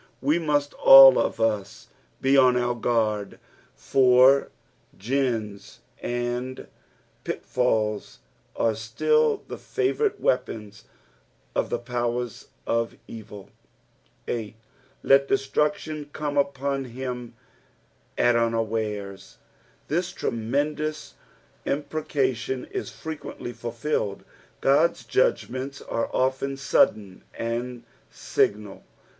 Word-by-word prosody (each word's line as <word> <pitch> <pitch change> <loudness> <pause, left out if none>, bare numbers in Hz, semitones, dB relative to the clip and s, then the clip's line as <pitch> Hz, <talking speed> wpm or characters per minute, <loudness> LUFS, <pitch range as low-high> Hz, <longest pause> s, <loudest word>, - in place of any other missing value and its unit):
We 150 +5 +2
must 145 -3 0
ail 135 -1 +10
of - - -1
us 110 -3 -2 0.3
be 135 +1 +3
on 130 -2 +5
our 120 0 +1
guard, 110 -4 -1 0.4
for 130 +1 +4 0.5
gins 115 -3 -2 0.2
and 120 +1 -3 0.6
pitfalls 110 -4 -1 0.4
arc 110 -2 +1
still 450 - +1
the - - -7
favourite 420 +1 -1
weapons 105 -5 -2 0.7
of - - -1
the - - -1
powers 120 -1 -3 0.2
of 115 0 -1
evil. 105 -3 -10 0.8
8. 110 -3 -4 0.2
" 140 +1 -34
Lei 135 - +6
dettnietion 150 +3 -1
come 145 -1 -3
upon, 140 -1 0
him 125 -1 -6 0.8
at 120 - +4
vnaiatra." 110 -4 -2 0.5
This 175 +4 -1
tremendous 150 +6 -2 0.5
impreca 145 -2 -1
tion 125 +2 -4
is - - -4
frequently 155 -5 -7
fulfilled. 120 -4 -3 0.4
God's 140 -1 +2
judgments 130 +2 0
are 115 - -3
often 135 +1 0
sudden 105 -8 +1
and 120 +1 -4 0.3
signal. 105 -1 -1
125 Hz, 95 wpm, -25 LUFS, 115-140 Hz, 0.8 s, ail